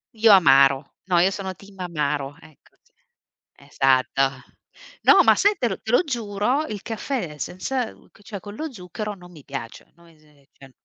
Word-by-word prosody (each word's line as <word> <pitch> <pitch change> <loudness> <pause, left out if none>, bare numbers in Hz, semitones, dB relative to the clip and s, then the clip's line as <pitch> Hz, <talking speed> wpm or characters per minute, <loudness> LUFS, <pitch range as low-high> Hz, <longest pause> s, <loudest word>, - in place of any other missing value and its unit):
Io 220 0 +5
amaro. 140 -6 +5
No, 180 -2 +2
io 190 +3 +3
sono 190 -1 -5
team 195 0 -17
amaro, 150 -5 -2
ecco 155 - -21
cioè. 485 0 -35 0.7
Esatto! 135 -1 +2 0.8
No, - - +7
ma - - +6
sai 410 0 +2
te 240 - +1
te 220 - -5
lo 245 - +4
giuro, 240 +2 -1
il 205 -3 -6
caffè 225 - -4
senza 225 - -3 0.3
cioè 200 0 -7
con 205 +2 -10
lo 315 +5 -5
zucchero 210 0 -6
non 180 -1 -15
mi 150 -4 -14
piace, 135 -5 -8
no 170 0 -21
ese 150 -3 -25
cioè 135 -1 -16
185 Hz, 165 wpm, -23 LUFS, 145-220 Hz, 0.8 s, No